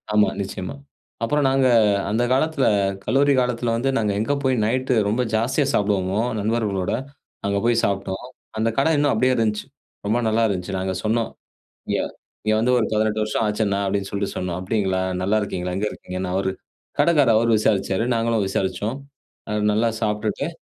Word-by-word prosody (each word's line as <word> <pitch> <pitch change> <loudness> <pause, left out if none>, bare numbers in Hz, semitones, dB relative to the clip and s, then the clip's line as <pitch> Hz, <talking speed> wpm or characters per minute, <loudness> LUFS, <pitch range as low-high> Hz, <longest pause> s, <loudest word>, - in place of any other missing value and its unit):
ஆமா, 105 0 +4
நிச்சயமா. 95 +2 -5 0.5
அப்புறம் 145 +5 +1
நாங்க 135 0 +3 0.4
அந்த 110 +4 +1
காலத்தில, 140 +1 +2 0.4
கல்லூரி 140 +2 +3
காலத்தில 120 -2 0
வந்து 125 +4 0
நாங்க 105 -2 +1
எங்க 110 +7 0
போய் 130 -1 +2
நைட்டு 130 +3 0
ரொம்ப 110 +5 +1
ஜாஸ்தியா 120 +6 +1
சாப்பிடுவோமோ, 100 -1 +1 0.2
நண்பர்களோட, 105 -4 -1 0.5
அங்க 100 0 0
போய் 120 -1 +3
சாப்ட்டோம். 95 -1 -1 0.3
அந்த 110 +1 +1
கடை 140 +4 +3
இன்னும் 145 -1 +3
அப்டியே 130 +4 +3
இருந்துச்சு. 110 -3 0 0.4
ரொம்ப 110 +4 +1
நல்லா 110 +1 +2
இருந்துச்சு. 95 -1 -3
நாங்க 95 0 -2
சொன்னோம், 115 +1 0 0.6
"இங்க - - +1 0.5
இங்க 110 - +3
வந்து 125 +3 +2
ஒரு 115 - +1
18 110 0 +1
வருஷம் 105 +1 -1
ஆச்சு 105 +1 -1
அண்ணா" 100 0 0
அப்டின்னு 100 0 -1
சொல்ட்டு 100 -1 -2
சொன்னோம். 90 -2 -2
அப்டிங்களா? 95 -1 0 0.2
நல்லாருக்கீங்களா? 95 -3 -1
எங்க 100 +2 -1
இருக்கீங்கன்னு, 90 0 -5
அவரு, 95 0 0 0.5
கடைக்காரு 150 -7 +4
அவரு 115 +1 +3
விசாரிச்சாரு 100 -1 +1
நாங்களும் 115 -2 +1
விசாரிச்சோம். 100 +5 -2 0.5
அது 105 0 0
நல்லா 110 +3 +2
சாப்ட்டுட்டு, 105 +3 -1
110 Hz, 155 wpm, -22 LUFS, 100-120 Hz, 0.6 s, ஆமா